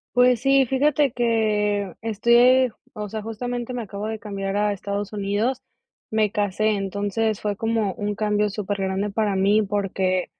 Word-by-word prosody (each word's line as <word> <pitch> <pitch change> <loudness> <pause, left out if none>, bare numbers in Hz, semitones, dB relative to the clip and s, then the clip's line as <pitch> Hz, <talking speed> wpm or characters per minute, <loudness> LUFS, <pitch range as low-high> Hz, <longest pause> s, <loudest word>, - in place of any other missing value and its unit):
Pues 250 -1 +4
sí, 270 0 +4
fíjate 280 +1 +2
que 210 -4 +1
estoy, 240 +4 +4 0.2
o 210 -3 -6
sea, 215 +1 -5
justamente 240 +3 -4
me 240 -2 -3
acabo 200 +1 -6
de 220 -1 -4
cambiar 200 -2 -4
a 210 0 +1
Estados 200 +1 -4
Unidos, 210 +6 -1 0.5
me 215 -2 +1
casé, 210 +1 +1
entonces 205 +2 -1
fue 205 -1 -2
como 225 -3 0
un 205 0 -3
cambio 210 -1 +1
supergrande 200 -1 -2
para 205 -1 0
mí 205 +3 +4
porque, 195 -2 -1
210 Hz, 150 wpm, -23 LUFS, 200-230 Hz, 0.5 s, Pues